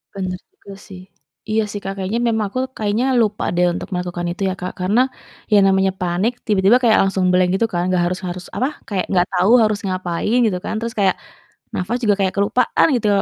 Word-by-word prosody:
Bener 185 -2 -4
juga 200 - -14
sih, 185 -2 -10 0.5
iya 220 +1 +2
sih, 205 - -5
Kak, 195 - -4
kayaknya 195 +4 -2
memang 220 -2 0
aku 255 - -3 0.2
kayaknya 215 +3 0 0.2
lupa 210 -2 -1
deh 180 +1 +3
untuk - - -5
melakukan 175 -1 -3
itu 175 - -8
ya, - - -1
Kak, 180 - -4
karena 205 +7 +3 0.5
ya - - +7
namanya 190 0 +3
panik, 180 +6 0 0.2
tiba-tiba 205 +2 +4
kayak 230 -3 +4
langsung 190 -1 0
blank 180 0 +3
gitu 230 - +2
kan, 175 -2 -2
enggak 180 -1 +1
harus 180 +1 -3
harus 180 0 -5
apa, 255 - +1 0.2
kayak 195 -3 -1
enggak 180 -1 +2
tahu 185 +3 +3
harus 215 -1 +2
ngapain 185 +4 -1
gitu 200 -5 0
kan. - - -3
Terus 230 0 -4
kayak 195 -3 +3 0.6
nafas 195 +7 -1
juga 210 -2 +3
kayak 190 - +1
kelupaan 200 +5 +2
gitu, 225 -3 0
195 Hz, 205 wpm, -19 LUFS, 180-215 Hz, 0.6 s, ya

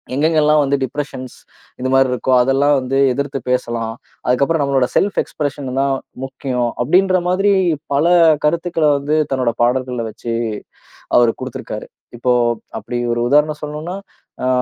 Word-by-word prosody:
எங்கெங்கெல்லாம் 155 +1 +3
வந்து 140 0 +1
டிப்ரஷன்ஸ் 130 -1 -5 0.4
இந்த 130 - -2
மாதிரி 135 0 +4
இருக்கோ 130 +1 -1
அதெல்லாம் 135 +3 +3
வந்து 130 +1 -2
எதிர்த்து 140 +1 -2
பேசலாம். 120 -3 -1 0.3
அதுக்கப்பறம் 140 +5 +2
நம்மளோட 135 -3 +2
செல்ஃப் 200 0 +2
எக்ஸ்பிரஷன் 145 -2 -4
தான் 135 0 +1 0.3
முக்கியம் 130 -2 -2
அப்படின்ற 185 +7 +3
மாதிரி 195 +3 +2 0.4
பல 140 +3 +2 0.4
கருத்துக்கள 165 +1 0
வந்து, 145 +2 -1
தன்னோட 130 -3 0
பாடல்கள்ல 125 0 0
வச்சி 115 +2 -6 0.8
அவரு 120 -1 +5
குடுத்திருக்காரு. - - -6 0.3
இப்போ 125 +1 +1 0.5
அப்படி 120 - -5 0.2
ஒரு 120 - -2
உதாரணம் 150 +1 +3
சொல்லணும்ன்னா 150 +4 -5 0.5
ஆ - - +1
135 Hz, 130 wpm, -18 LUFS, 125-150 Hz, 0.8 s, அவரு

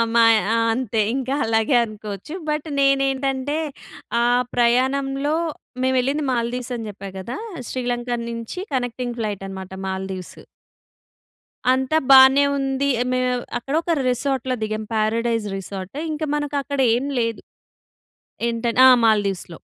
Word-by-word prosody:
మా 230 - +6 0.3
ఆ! - - +2 0.2
అంతే 225 -3 0
ఇంకా 270 +1 -1
అలాగే 225 +3 +2
అనుకోవచ్చు. 210 - -8 0.2
బట్ 300 +1 -2
నేనేంటంటే 275 +1 +1 0.6
ఆ - - +3 0.3
ప్రయాణంలో 270 +4 +2 0.5
మేమెళ్ళింది 260 +3 +1
మాల్దీవ్స్ 245 +1 -2
అని 225 -2 -6
చెప్పా 195 0 -9
కదా! 235 +7 -5 0.3
శ్రీలంక 245 -1 -3 0.2
నుంచి 230 +9 -6 0.2
కనెక్టింగ్ 245 -1 -3
ఫ్లైటనమాట 195 -3 -5 0.2
మాల్దీవ్స్. 190 -1 -5 1.3
అంతా 265 +4 +1
బానే 265 +1 +8
ఉంది, 270 +1 0 0.2
మేము 255 0 +1 0.3
అక్కడ 270 +4 -6
ఒక 340 - -1 0.2
రిసార్ట్‌లో 260 0 -1
దిగాం. 215 0 -2
Paradise 225 +1 0
resort. 195 +3 -7 0.2
ఇంక 310 +1 -3
మనకక్కడ 285 -1 -2 0.2
ఏమి 275 +3 -2
లేదు. 230 -1 -1 1.1
ఏంటం 230 0 -1
ఆ! - - +10 0.2
మాల్దీవ్స్‌లో. 200 -6 +1
245 Hz, 115 wpm, -22 LUFS, 220-270 Hz, 1.3 s, ఆ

